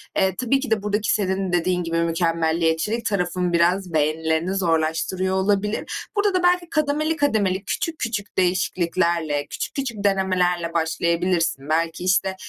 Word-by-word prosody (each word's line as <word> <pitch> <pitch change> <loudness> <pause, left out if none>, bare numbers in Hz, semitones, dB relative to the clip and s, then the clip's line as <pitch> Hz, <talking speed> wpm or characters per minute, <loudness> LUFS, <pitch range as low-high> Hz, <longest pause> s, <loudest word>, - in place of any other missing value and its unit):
Eee, 190 -1 +2
tabii 255 +4 +1
ki 265 -5 -5
de 210 -2 +1
buradaki 210 +2 0
senin 190 -2 0
dediğin 180 +1 +1
gibi 165 0 -2
mükemmeliyetçilik 165 +5 0
tarafın 180 -3 -1
biraz 175 +1 +2
beğenilerini 160 +3 0
zorlaştırıyor 180 +2 0
olabilir. 200 +2 0 0.3
Burada 405 -1 +2
da 365 - +1
belki 355 -1 +2
kademeli 305 +1 0
kademeli, 210 -10 +1
küçük 330 +8 -3
küçük 205 -4 -4
değişikliklerle, 170 -4 0
küçük - - -5
küçük 240 -7 -4
denemelerle 180 -3 +1
başlayabilirsin. 170 -2 0
Belki 165 +2 0
işte 190 +1 +1
185 Hz, 135 wpm, -22 LUFS, 170-210 Hz, 0.3 s, Eee